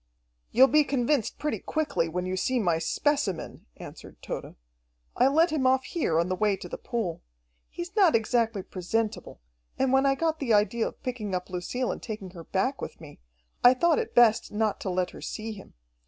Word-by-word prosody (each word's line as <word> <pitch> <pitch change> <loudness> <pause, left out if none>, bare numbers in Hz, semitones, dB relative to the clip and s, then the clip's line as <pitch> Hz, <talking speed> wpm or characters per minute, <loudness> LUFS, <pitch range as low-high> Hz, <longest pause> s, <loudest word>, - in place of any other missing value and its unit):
"You'll 260 +2 +6
be 300 +2 +4
convinced 270 -3 0
pretty 300 -1 -2
quickly, 285 - -1
when 180 +2 -3
you 185 0 -2
see 255 +7 0
my 170 -6 +1
specimen," 205 - -1
answered - - -11
Tode. - - -6 0.6
"I 250 - +4
let 320 +5 +3
him 280 -4 +1
off 260 0 +3
here 170 - 0
on 170 - +1
the 185 - -1
way 205 0 +1
to 180 - -8
the - - -7
pool. 220 -9 -3 0.5
He's 345 +3 -7
not 380 - +5
exactly 225 -2 +1
presentable, 200 - -3 0.4
and 265 0 +1
when 265 +1 +4
I 275 - +3
got 320 +2 -1
the 235 -6 +2
idea 220 +2 +2
of - - -11
picking 230 -7 -3
up 180 0 -5
Lucille 215 +8 -2
and - - -6
taking 210 -5 -7
her 170 -3 -11
back 255 +8 -1
with - - -7
me, 150 -3 -13 0.4
I 245 +1 +8
thought 340 - +3
it 465 - -4
best 235 -2 +4
not 215 0 0
to - - -3
let 180 0 -1
her - - -11
see 220 0 -5
him. 195 - -12
230 Hz, 200 wpm, -27 LUFS, 185-275 Hz, 0.6 s, I